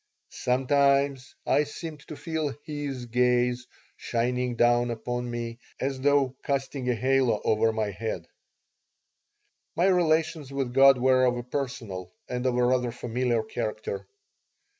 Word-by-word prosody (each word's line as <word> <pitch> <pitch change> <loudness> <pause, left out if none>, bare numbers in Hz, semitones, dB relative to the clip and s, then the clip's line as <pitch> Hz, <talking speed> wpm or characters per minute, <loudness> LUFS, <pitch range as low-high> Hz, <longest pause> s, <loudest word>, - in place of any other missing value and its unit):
Sometimes 140 +1 +1
I 150 - +3
seemed 155 +1 -7
to 155 - -7
feel 160 -4 -3
His 145 -4 -5
gaze 125 +1 +1 0.3
shining 125 +1 -1
down 120 +1 +3
upon 120 +1 -3
me, 120 0 -5 0.2
as 135 0 -2
though 140 -2 +3
casting 135 -2 -2
a 125 - +2
halo 130 -1 +2
over 110 +1 +3
my 110 -2 -1
bead 115 -1 -3 1.5
My 175 - +2
relations 160 -5 +2
with 135 -3 -2
God 135 0 +7
were 130 +1 +4
of 125 -1 +2
a 120 - -4
personal 125 -8 -5 0.2
and 125 +1 -2
of 125 -1 +1
a 125 - +3
rather 125 -1 +1
familiar 120 -1 -1
character. 110 -4 -4
125 Hz, 135 wpm, -27 LUFS, 120-140 Hz, 1.5 s, God